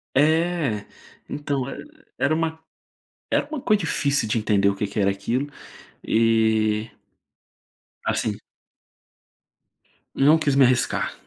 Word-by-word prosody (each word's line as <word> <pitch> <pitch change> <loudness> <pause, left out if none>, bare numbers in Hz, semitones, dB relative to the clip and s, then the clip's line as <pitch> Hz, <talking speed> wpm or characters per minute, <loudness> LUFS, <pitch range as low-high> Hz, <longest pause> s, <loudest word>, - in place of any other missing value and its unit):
É. 155 -6 +1 0.4
Então 140 -2 -3
e - - -8 0.3
era 140 +3 +1
uma 160 0 -1 0.7
era - - +1
uma 300 -2 -5
coisa 215 -3 +2
difícil 145 -6 0
de 105 - 0
entender 100 -2 +2
o 100 - -1
que 105 - -2
que 105 - -4
era 100 -1 +3
aquilo, 115 +8 -2 0.6
e 110 -1 +2 1.2
assim - - -1 1.8
Não 145 +4 +5
quis 145 -3 0
me 135 -2 +6
arriscar. 125 0 +1
135 Hz, 115 wpm, -23 LUFS, 110-155 Hz, 1.8 s, me